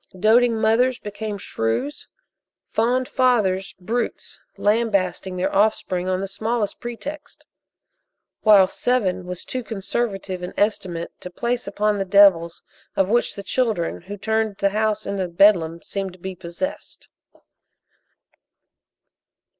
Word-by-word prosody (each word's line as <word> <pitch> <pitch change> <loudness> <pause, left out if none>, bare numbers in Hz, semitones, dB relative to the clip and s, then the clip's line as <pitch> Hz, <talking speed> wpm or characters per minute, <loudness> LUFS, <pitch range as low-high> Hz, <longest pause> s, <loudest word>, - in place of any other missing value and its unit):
Doting 225 +3 +4
mothers 235 +3 +3
became 210 0 -5
shrews; 180 - -3 0.6
fond 245 +3 +1
fathers, 210 -7 +1
brutes, 230 +6 -3 0.2
lambasting 200 -4 0
their 190 +2 -1
offspring 195 -3 +1
on 185 0 0
the 195 - -3
smallest 215 +2 -2
pretext; 285 +6 -8 1.0
while 205 -3 +7
seven 185 -6 0
was 180 0 -6
too 255 -1 -4
conservative 195 -3 -3
an 180 - -6
estimate 185 -5 -1
to 180 - -8
place 235 +6 -2
upon 205 +1 0
the 195 - -1
devils 185 -4 +4 0.3
of 190 0 +2
which 240 +2 +1
the 200 - -7
children 215 -6 -1
who 200 +4 -8
turned 220 0 0
the 200 - +2
house 215 +1 0
into 195 -2 -2
Bedlam 170 -2 +3
seemed 195 -2 -4
to - - -15
be 190 +2 -5
possessed. 180 - -6
205 Hz, 120 wpm, -22 LUFS, 185-225 Hz, 1.0 s, while